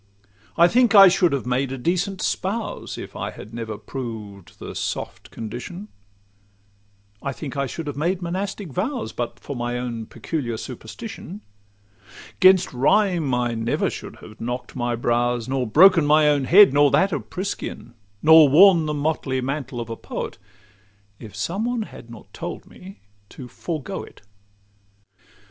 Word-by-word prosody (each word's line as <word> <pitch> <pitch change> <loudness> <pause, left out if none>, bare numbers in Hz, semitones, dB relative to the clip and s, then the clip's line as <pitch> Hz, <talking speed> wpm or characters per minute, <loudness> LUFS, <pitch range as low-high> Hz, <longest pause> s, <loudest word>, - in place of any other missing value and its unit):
I 170 - +7
think 240 +3 +3
I 195 -2 +10
should 180 -1 +2
have 140 -4 -2
made 130 +2 -1
a 135 - -4
decent 180 +7 -1
spouse, 205 +4 -3
If - - -9
I - - -4
had 110 +3 -11
never 115 -2 -5
proved 110 -8 -8
the - - -8
soft - - -5
condition; 150 - -7 1.3
I 140 - -3
think 140 0 -7
I 140 -1 -1
should 165 +6 -6
have 145 - -5
made 175 +5 0
monastic 190 +2 -4
vows, 230 - -3
But 120 -1 -4
for 140 - -7
my 120 0 -3
own 120 -3 -5
peculiar 125 -9 -4
superstition: 105 - -8 1.0
'Gainst 185 -3 +5
rhyme 170 +3 +2
I 120 -1 0
never 115 +1 -1
should - - -8
have 110 - -13
knock'd 125 +2 -5
my 120 -1 -1
brows, 120 0 0
Nor 130 -2 -1
broken 170 - +6
my 150 0 +5
own 145 -2 +1
head, 195 +2 +7
nor 145 0 +5
that 195 +7 +3
of - - -4
Priscian, 185 - -5 0.3
Nor 160 -1 +8
worn 170 +1 +6
the 150 - -2
motley 145 -3 -1
mantle 135 -1 -4
of 115 -1 -5
a - - -3
poet, - - -6 0.8
If 105 -4 -11
some 170 - -2
one 240 -1 -1
had 120 - -13
not 115 -2 -13
told - - -6
me 190 +2 -14 0.3
to 130 - -10
forego 150 +2 -5
it. - - -14
140 Hz, 160 wpm, -23 LUFS, 120-180 Hz, 1.3 s, I